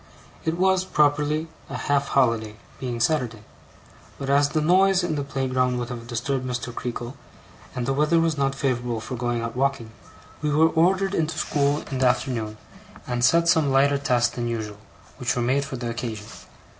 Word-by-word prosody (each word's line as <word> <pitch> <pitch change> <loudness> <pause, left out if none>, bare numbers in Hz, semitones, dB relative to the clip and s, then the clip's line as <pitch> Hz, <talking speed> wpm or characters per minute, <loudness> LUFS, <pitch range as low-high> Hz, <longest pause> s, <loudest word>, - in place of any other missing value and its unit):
It 160 +1 0
was, 190 0 +3
properly, 150 -1 +1 0.2
a - - -4
half 140 -1 0
holiday; 115 -5 +1 0.2
being 125 -3 -3
Saturday. 115 -4 0 0.7
But 135 0 -3
as 140 0 +4
the 155 - 0
noise 185 +4 +4
in 175 -2 -1
the 145 -2 -1
playground 130 -2 0
would 120 -1 -3
have 115 -2 -7
disturbed 125 +3 -2
Mr. 125 -1 -4
Creakle, 120 +2 -5 0.6
and 125 - -2
the 135 - 0
weather 150 +4 +3
was 165 -1 +1
not 135 -1 0
favourable 125 -4 -1
for 120 +4 -6
going 120 -1 -1
out 115 0 -4
walking, 130 -4 -1 0.5
we 150 - 0
were 155 +2 +4
ordered 190 +4 +2
into 160 -3 -1
school 145 0 +1
in 130 - -2
the 130 - +4
afternoon, 115 -4 -1 0.5
and 120 -1 -2
set 165 +7 +4
some 160 -5 +3
lighter 140 +1 +3
tasks 125 -4 +1
than 120 -1 -3
usual, 110 -3 -4 0.4
which 125 - -1
were 120 - 0
made 135 +4 +1
for 140 - -6
the 120 -1 -3
occasion. 115 -3 -5
135 Hz, 180 wpm, -24 LUFS, 120-150 Hz, 0.7 s, as